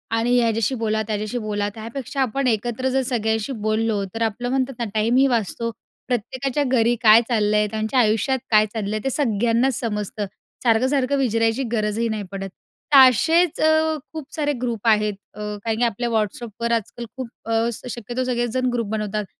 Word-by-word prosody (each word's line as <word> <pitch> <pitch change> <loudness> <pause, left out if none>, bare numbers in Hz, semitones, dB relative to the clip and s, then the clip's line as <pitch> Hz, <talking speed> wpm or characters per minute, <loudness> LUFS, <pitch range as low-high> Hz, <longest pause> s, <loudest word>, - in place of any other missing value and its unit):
आणि 240 +2 +2
ह्याच्याशी 230 +2 +1
बोला, 220 0 0
त्याच्याशी 215 +2 -2
बोला 210 -2 -2
त्यापेक्षा 235 +4 -5
आपण 260 +2 0
एकत्र 240 +3 0
जर 265 +1 +1
सगळ्यांशी 225 -1 -1 0.2
बोललो, 215 -2 +1
तर 225 - -5
आपलं 245 +3 -2
म्हणतात 265 0 0
ना 235 - -1
टाईमही 230 +5 +3
वाचतो, 230 -1 -1 0.4
प्रत्येकाच्या 255 +4 -1
घरी 240 -2 +2
काय 220 0 +8
चाललंय? 210 -2 +2
त्यांच्या 220 +4 0
आयुष्यात 225 +4 +2
काय 215 -1 +6
चाललंय? 215 -1 -2
ते 270 - 0
सगळ्यांनाच 235 -1 +1
समजतं. 210 -2 -3 0.4
सारखं-सारखं 260 +4 +2
विचरायची 230 0 +1
गरजही 215 0 0
नाही 215 -2 -3
पडत, 195 0 -5 0.4
तर - - +9
असेच 330 +7 +2
अ, 315 0 +3 0.2
खूप 310 -3 -8
सारे 290 -2 0
ग्रुप 235 -3 -2
आहेत. 210 -1 +3 0.2
अ, - - -13
काही-काही 210 +2 -2
आपल्या 235 +1 -1
व्हॉट्सअपवर 225 +1 -2
आजकाल 230 +2 -3
खूप 255 -3 -5 0.2
अ, 225 0 +1 0.3
शक्यतो 240 +2 -4
सगळेच 240 -1 -1
जण 255 0 +1
ग्रुप 230 -3 -1
बनवतात. 210 -1 -2
230 Hz, 160 wpm, -22 LUFS, 215-255 Hz, 0.4 s, तर